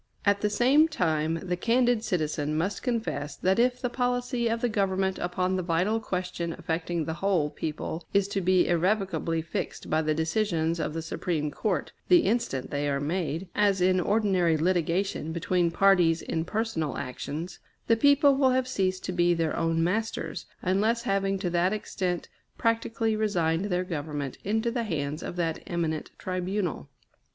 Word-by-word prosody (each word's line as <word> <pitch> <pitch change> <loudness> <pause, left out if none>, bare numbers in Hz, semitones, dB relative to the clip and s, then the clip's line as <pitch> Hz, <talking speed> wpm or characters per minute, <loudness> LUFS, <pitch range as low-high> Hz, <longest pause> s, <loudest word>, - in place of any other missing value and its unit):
At 200 0 +3
the 210 - +2
same 265 +9 +4
time 160 - 0
the 180 -1 -1
candid 235 +3 +2
citizen 155 -5 -1
must 185 +6 -1
confess 220 - -2
that 190 +7 +1
if 250 +1 +2
the 250 - -1
policy 245 -1 0
of 230 0 -1
the 245 - +2
Government 195 -3 0
upon 180 +1 -1
the 185 - 0
vital 180 +6 +1
question 180 -4 -3
affecting 165 0 -2
the 160 - -2
whole 180 -7 +1
people 160 +2 -4
is 200 -1 +2
to 195 - -1
be 185 0 +3
irrevocably 175 -2 0
fixed 165 - -5
by 155 - +3
the 155 -1 0
decisions 165 0 0
of 155 -1 -2
the 165 - -3
Supreme 155 -2 -2
Court, - - -2 0.2
the 355 -2 +6
instant 200 - -1
they 145 0 -1
are 140 0 0
made, 165 +3 -2
as 205 -2 +2
in 185 +1 +3
ordinary 185 -4 +2
litigation 175 0 0
between 175 0 +1
parties 175 -2 +4
in 160 0 -2
personal 195 - -2
actions, 145 +5 -5 0.3
the 230 - +4
people 285 +3 +5
will 270 -1 +3
have 255 0 +1
ceased 190 -6 -1
to - - -2
be 175 -1 +3
their 165 -1 0
own 165 0 +1
masters, 220 +6 -2 0.2
unless 215 +6 +1
having 195 0 0
to 185 -2 -2
that 175 +3 +2
extent 185 -4 -3 0.3
practically 230 -1 0
resigned 180 -5 +1
their 180 -2 0
Government 145 -6 -4
into 220 +3 0
the 240 0 -1
hands 150 -4 -3
of - - -5
that 165 -2 -1
eminent 165 -3 -2
tribunal. 185 - -3
185 Hz, 165 wpm, -27 LUFS, 165-215 Hz, 0.3 s, the